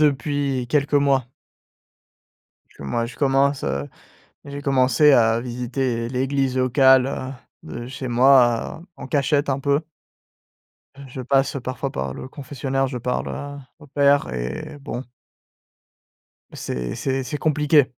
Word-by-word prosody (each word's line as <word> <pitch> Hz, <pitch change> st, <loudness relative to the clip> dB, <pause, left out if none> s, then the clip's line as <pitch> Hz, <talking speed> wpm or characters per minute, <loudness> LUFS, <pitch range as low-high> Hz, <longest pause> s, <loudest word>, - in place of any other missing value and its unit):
depuis 140 Hz, -3 st, +1 dB
quelques 145 Hz, +2 st, +1 dB
mois. 140 Hz, -3 st, +3 dB, 1.5 s
Moi 70 Hz, +13 st, -2 dB
je 120 Hz, -, -11 dB
commence, 140 Hz, 0 st, +2 dB
heu, 70 Hz, +1 st, -2 dB, 0.6 s
j'ai 145 Hz, 0 st, -7 dB
commencé 135 Hz, +1 st, +4 dB
à 115 Hz, -2 st, +4 dB
visiter 120 Hz, -1 st, -2 dB
l'église 130 Hz, +1 st, -1 dB
locale, 130 Hz, 0 st, +5 dB
heu, 130 Hz, -1 st, -4 dB, 0.3 s
de 120 Hz, -, -7 dB
chez 130 Hz, 0 st, -6 dB
moi 125 Hz, +3 st, +4 dB
en -, -, -8 dB
cachette 145 Hz, 0 st, +1 dB
un 135 Hz, -1 st, +1 dB
peu. 140 Hz, +1 st, +1 dB, 1.3 s
Je 130 Hz, +1 st, -7 dB
passe 135 Hz, +2 st, +1 dB
parfois 130 Hz, +2 st, -4 dB
par 65 Hz, -, -3 dB
le 130 Hz, -, -8 dB
confessionnal 135 Hz, -1 st, -3 dB
confessionnaire, -, -, +2 dB
je 130 Hz, -1 st, -4 dB
parle 125 Hz, +1 st, -2 dB
à 145 Hz, 0 st, -7 dB, 0.2 s
au 150 Hz, -, -15 dB
père 140 Hz, 0 st, +3 dB
et 60 Hz, -, -5 dB
bon. 135 Hz, -3 st, -5 dB, 1.5 s
C'est 60 Hz, -1 st, -4 dB
c'est 135 Hz, 0 st, -2 dB
c'est 145 Hz, +3 st, -4 dB
compliqué, 150 Hz, -1 st, +3 dB
135 Hz, 130 wpm, -22 LUFS, 125-140 Hz, 1.5 s, locale